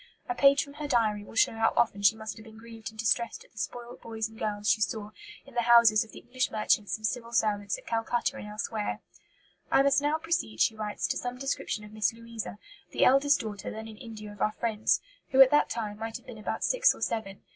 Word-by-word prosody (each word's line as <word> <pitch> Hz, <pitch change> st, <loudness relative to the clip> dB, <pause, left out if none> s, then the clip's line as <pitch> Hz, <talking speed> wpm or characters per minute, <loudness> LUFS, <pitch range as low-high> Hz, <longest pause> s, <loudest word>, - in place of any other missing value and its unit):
A -, -, -1 dB
page 280 Hz, -4 st, +5 dB
from 280 Hz, -, -12 dB
her 295 Hz, 0 st, -5 dB
diary 215 Hz, -6 st, +1 dB
will 205 Hz, -, -13 dB
show -, -, +4 dB
how 225 Hz, 0 st, +1 dB
often 200 Hz, -3 st, +2 dB
she 200 Hz, +2 st, +5 dB
must 220 Hz, -1 st, -6 dB
have 220 Hz, -, -12 dB
been 220 Hz, -1 st, -14 dB
grieved 225 Hz, 0 st, -9 dB
and 220 Hz, -, -17 dB
distressed 230 Hz, +1 st, 0 dB
at -, -, -25 dB
the 220 Hz, -, -12 dB
spoilt 240 Hz, +1 st, -6 dB
boys 220 Hz, -1 st, -3 dB
and 220 Hz, 0 st, -15 dB
girls 210 Hz, -1 st, -2 dB
she 215 Hz, -, +3 dB
saw 215 Hz, -1 st, -2 dB, 0.3 s
in 275 Hz, -, -15 dB
the 240 Hz, -, +1 dB
houses 235 Hz, -2 st, +6 dB
of 225 Hz, -, -15 dB
the -, -, -11 dB
English 255 Hz, 0 st, -2 dB
merchants 215 Hz, -1 st, +1 dB
and 215 Hz, -, -6 dB
Civil 235 Hz, +1 st, -2 dB
servants 205 Hz, -3 st, +1 dB
at -, -, -15 dB
Calcutta 230 Hz, +1 st, -1 dB
and -, -, -7 dB
elsewhere. 210 Hz, 0 st, -3 dB, 0.7 s
"I 270 Hz, -, +5 dB
must 280 Hz, 0 st, +3 dB
now 295 Hz, +2 st, +1 dB
proceed," 320 Hz, -, -2 dB
she 220 Hz, -, +3 dB
writes, 210 Hz, -1 st, -3 dB
"to -, -, 0 dB
some 245 Hz, 0 st, -4 dB
description 270 Hz, -5 st, -3 dB
of 210 Hz, 0 st, -12 dB
Miss 215 Hz, +1 st, +1 dB
Louisa, 230 Hz, -4 st, -7 dB, 0.3 s
the -, -, +2 dB
eldest 275 Hz, +2 st, +4 dB
daughter 210 Hz, -4 st, -6 dB
then 220 Hz, +1 st, -7 dB
in 220 Hz, -1 st, -11 dB
India 215 Hz, -2 st, -9 dB
of 205 Hz, -, -12 dB
our 215 Hz, -, +2 dB
friends, 220 Hz, -2 st, +1 dB, 0.3 s
who 265 Hz, -, +1 dB
at 265 Hz, -1 st, +9 dB
that 295 Hz, -, +4 dB
time 215 Hz, -3 st, -4 dB
might 225 Hz, +1 st, -4 dB
have 240 Hz, -, -20 dB
been 245 Hz, -4 st, -10 dB
about 215 Hz, -, -3 dB
six -, -, +4 dB
or -, -, -14 dB
seven. 195 Hz, -4 st, -3 dB
225 Hz, 240 wpm, -29 LUFS, 215-245 Hz, 0.7 s, at